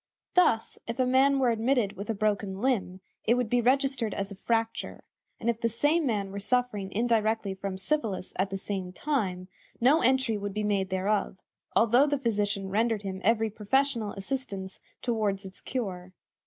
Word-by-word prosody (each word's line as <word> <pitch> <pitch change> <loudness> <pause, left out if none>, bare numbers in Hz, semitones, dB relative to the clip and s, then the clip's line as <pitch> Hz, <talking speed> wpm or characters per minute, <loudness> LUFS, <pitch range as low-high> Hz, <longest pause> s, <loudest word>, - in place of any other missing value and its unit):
Thus, 355 -12 +3
if 230 +1 -4
a 255 - +2
man 265 +2 +4
were 255 -3 +3
admitted 230 -2 +1
with 200 +2 -8
a 225 - 0
broken 200 -2 -1
limb, 200 -7 0 0.2
it 235 - +3
would 245 -3 -1
be 245 0 +3
registered 260 -3 +2
as 200 0 -3
a - - -7
fracture; 225 +3 -2 0.4
and - - -5
if 235 -1 0
the 230 - +2
same 290 +7 +2
man 200 -4 -1
were 200 - -5
suffering 210 -3 0
indirectly 220 -2 +1
from 190 0 -5
syphilis 200 -3 -1
at 190 +2 +1
the 195 - -3
same 190 -2 -4
time, 190 -9 -2 0.3
no 275 +7 +5
entry 255 -3 +2
would 200 0 -5
be 210 - -1
made 200 -2 0
thereof, 190 +1 0 0.4
although 240 +5 +5
the 290 0 +1
physician 205 -6 -1
rendered 220 0 +1
him 190 -1 -5
every 225 +1 +2
professional 225 +1 0
assistance 195 -3 -5 0.2
toward 210 -5 0
its 190 0 -5
cure. 185 -7 -4
220 Hz, 175 wpm, -28 LUFS, 195-250 Hz, 0.4 s, no